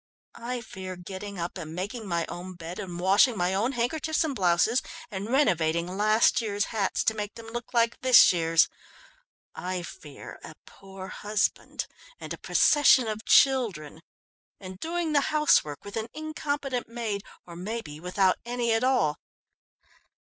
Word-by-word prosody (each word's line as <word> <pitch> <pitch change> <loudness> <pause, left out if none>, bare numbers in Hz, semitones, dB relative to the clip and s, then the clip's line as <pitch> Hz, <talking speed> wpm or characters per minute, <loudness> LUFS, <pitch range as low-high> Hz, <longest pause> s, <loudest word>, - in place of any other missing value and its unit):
I 245 +1 -3
fear 190 -4 -8
getting 190 +3 -8
up 175 +2 -4
and 160 -1 -7
making 205 +5 -5
my 170 -2 -1
own 180 +1 -7
bed 170 +1 -8
and 180 -3 -6
washing 200 +6 +4
my 180 +1 +1
own 225 +8 0
handkerchiefs 305 +7 0
and 300 -4 -2
blouses, 190 +5 +2 0.3
and 200 +2 -5
renovating 175 - +1
last 215 +4 +3
year's 205 -2 -1
hats 200 -4 0
to 220 - +2
make 210 -1 -5
them 230 - -10
look 235 +1 -7
like 235 -1 +1
this 255 -6 +7
year's. 165 -1 +3 0.9
I 180 -1 -4
fear 375 - -11
a - - -10
poor 190 -1 -11
husband 210 +1 -2 0.3
and - - -6
a - - -9
procession 275 -5 +4
of 215 0 -4
children, 205 - +3 0.6
and 185 -1 -9
doing 335 +1 -2
the 285 - +4
housework 300 - +2
with 205 - -8
an 225 0 -3
incompetent 290 -4 -3
maid, 225 -4 -3 0.2
or 170 - -11
maybe 180 -4 -6
without 185 +2 +1
any 240 -1 -1
at 225 +2 +1
all. 175 - +2
205 Hz, 155 wpm, -27 LUFS, 180-240 Hz, 0.9 s, this